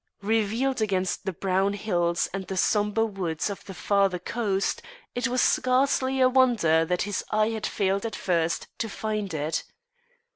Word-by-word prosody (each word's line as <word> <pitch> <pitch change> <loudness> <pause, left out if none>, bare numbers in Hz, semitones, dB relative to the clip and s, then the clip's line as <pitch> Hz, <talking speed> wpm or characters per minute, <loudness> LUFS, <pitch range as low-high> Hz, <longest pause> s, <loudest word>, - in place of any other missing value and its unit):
Revealed 225 +4 0
against 190 -3 -1
the 190 - 0
brown 190 +2 0
hills 175 -4 0
and 190 -2 -4
the 190 - -4
sombre 210 +4 +2
woods 190 -4 -2
of 200 - -8
the 195 - -8
farther 195 -2 +2
coast, 195 +1 -1 0.3
it 245 +1 0
was 250 0 +1
scarcely 260 +1 +2
a 255 - +6
wonder 240 -12 +4
that 180 +2 0
his 205 0 -2
eye 215 +1 +2
had 220 -1 -2
failed 195 0 0
at 225 -2 -3
first 170 -2 0
to 225 - -2
find 215 -2 -3
it. 155 0 -2
200 Hz, 160 wpm, -26 LUFS, 185-225 Hz, 0.3 s, a